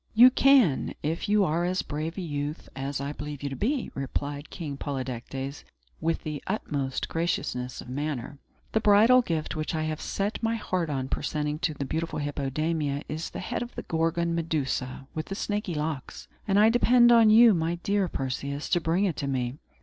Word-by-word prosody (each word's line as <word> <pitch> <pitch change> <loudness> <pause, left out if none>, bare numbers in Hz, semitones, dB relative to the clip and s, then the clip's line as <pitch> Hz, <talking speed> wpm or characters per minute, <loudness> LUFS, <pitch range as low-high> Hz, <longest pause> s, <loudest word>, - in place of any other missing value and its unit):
"You 245 +3 +9
can, 260 - +4
if 160 +7 -2
you 210 -1 +4
are 170 +1 0
as 180 +1 0
brave 155 +4 -4
a - - -2
youth 145 -2 -4
as 135 0 -3
I 140 +1 -3
believe 150 -1 -7
you 140 - -1
to 135 - -5
be," 255 - -1
replied 140 +2 -4
King 155 -5 -5
Polydectes, 135 0 -5 0.4
with 165 +1 -1
the 150 -2 -5
utmost 145 -10 -2
graciousness 125 -7 -2
of - - -12
manner. 140 0 -4 0.3
"The 220 - +2
bridal 220 +4 +6
gift 165 -9 -2
which 155 +1 -2
I 155 - -1
have 155 0 -3
set 200 +2 -2
my 225 0 +1
heart 185 -6 -2
on 135 -3 -2
presenting 150 +1 -2
to 160 -3 -1
the 140 - -3
beautiful 160 +5 -3
Hippodamia 145 +1 -1
is 155 +2 -4
the - - -8
head 230 +5 -3
of 240 0 -6
the - - -5
Gorgon 165 +1 0
Medusa 140 -6 -2
with 155 0 -4
the 195 - -4
snaky 205 -4 -2
locks; 150 -3 -4 0.2
and 195 -1 +3
I 215 +1 +7
depend 240 0 +5
on 230 -2 +7
you, 225 +1 +8
my 165 -1 0
dear 200 -1 +1
Perseus, 140 0 -3
to 175 - +2
bring 170 +5 +1
it 175 -6 -1
to 140 - -2
me. 130 0 -2
155 Hz, 190 wpm, -27 LUFS, 140-195 Hz, 0.4 s, You